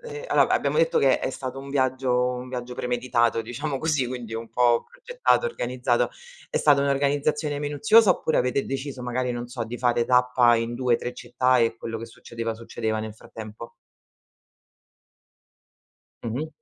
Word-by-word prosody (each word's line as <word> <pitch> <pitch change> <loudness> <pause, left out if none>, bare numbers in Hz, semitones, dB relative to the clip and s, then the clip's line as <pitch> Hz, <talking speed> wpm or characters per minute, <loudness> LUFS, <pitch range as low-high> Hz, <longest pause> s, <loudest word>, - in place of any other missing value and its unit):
e 465 0 -8
allora, - - +3
abbiamo - - +1
detto - - +3
che - - +4
è - - -3
è - - -1
stato 130 0 -6
un 140 +1 -8
viaggio 130 -2 0 0.2
un 125 +1 -7
viaggio 125 -1 -5
premeditato, 120 -2 0
diciamo 135 +4 -4
così, 150 -5 0
quindi 120 -3 -6
un 115 0 -5
po' 120 -1 +3
progettato, - - 0
organizzato, 125 - -1 0.4
è - - -2
stata 145 -2 +4
un'organizzazione 145 +1 0
minuziosa, 150 +9 +4
oppure 160 -3 +1
avete 125 +2 +1
deciso 135 -1 -5
magari, 125 +1 -2
non 120 0 -5
so, 120 -2 -4
di 120 +2 -7
fare 120 -1 +2
tappa 125 -1 +4
in 115 +1 -2
2-3 125 0 0
città 125 +1 +1
e 115 -1 +2
quello 115 -1 -5
che 115 - -6
succedeva, 115 0 -6
succedeva 110 -1 -3
nel 110 -1 -6
frattempo? 110 +1 -10 2.5
Mh-mh. 130 +8 -3
125 Hz, 160 wpm, -25 LUFS, 120-140 Hz, 2.5 s, che